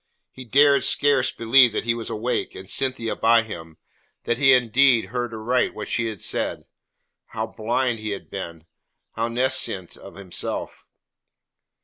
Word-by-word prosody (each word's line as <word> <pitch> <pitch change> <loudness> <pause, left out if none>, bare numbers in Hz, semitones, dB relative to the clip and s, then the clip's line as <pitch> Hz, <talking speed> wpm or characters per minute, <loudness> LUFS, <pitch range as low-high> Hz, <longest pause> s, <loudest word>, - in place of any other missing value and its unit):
He 130 - -11
dared 140 +2 +4
scarce 140 -1 +2
believe 120 0 +4
that - - -2
he 115 - +2
was 115 -1 -6
awake, 115 +3 -2
and 95 - -10
Cynthia 130 0 -2
by 115 0 +4
him 80 -7 -9 0.5
that 120 +1 -1
he 135 - +4
had 130 -1 +6
indeed 125 -1 +3
heard 120 +3 -4
aright 115 +3 -1
what 105 - -6
she 115 -1 0
had 110 -5 -6
said. - - -2 0.6
How 110 0 -4
blind 120 +2 -1
he 110 0 -5
had 100 -1 -6
been, 85 -4 -7 0.5
how 115 +1 -2
nescient 120 -7 -1
of 100 - -13
himself! 95 -3 -5
115 Hz, 155 wpm, -23 LUFS, 110-130 Hz, 0.6 s, had